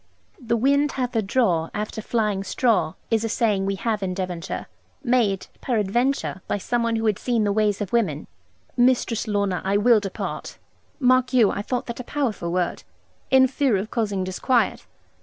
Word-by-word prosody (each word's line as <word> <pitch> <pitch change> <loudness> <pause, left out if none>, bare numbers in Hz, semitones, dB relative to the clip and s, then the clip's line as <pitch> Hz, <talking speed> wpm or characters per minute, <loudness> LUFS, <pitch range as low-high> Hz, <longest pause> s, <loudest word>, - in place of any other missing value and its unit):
'The 235 -1 0
wind 280 +4 +2
hath 250 -2 -2
a 225 - +3
draw 195 -7 +1
after 215 +1 -4
flying 210 -3 -1
straw' 220 -4 +1 0.2
is 225 -1 +2
a 225 - -1
saying 210 -4 +1
we 195 - 0
have 215 +1 -2
in 185 -1 -2
Devonshire, 180 -3 -4 0.4
made, 235 -7 +1 0.2
peradventure, 240 -1 0
by - - 0
somebody 230 +2 0
who 225 - -2
had 210 -2 +1
seen 235 -3 0
the 205 - +1
ways 210 -1 +1
of 200 0 -4
women. 180 -11 0 0.5
'Mistress 245 -2 +2
Lorna, 200 -3 0
I 195 +1 +1
will 225 +1 +5
depart' 195 -2 -5 0.4
mark 255 -1 +3
you, 235 -5 +5
I - - -3
thought 245 +4 -3
that 235 - -6
a - - -4
powerful 235 -11 -2
word 180 0 -1 0.5
'in 265 0 +6
fear 260 -4 +1
of 200 +4 -4
causing 205 -5 -1
disquiet. 230 +7 0
220 Hz, 175 wpm, -23 LUFS, 195-245 Hz, 0.5 s, in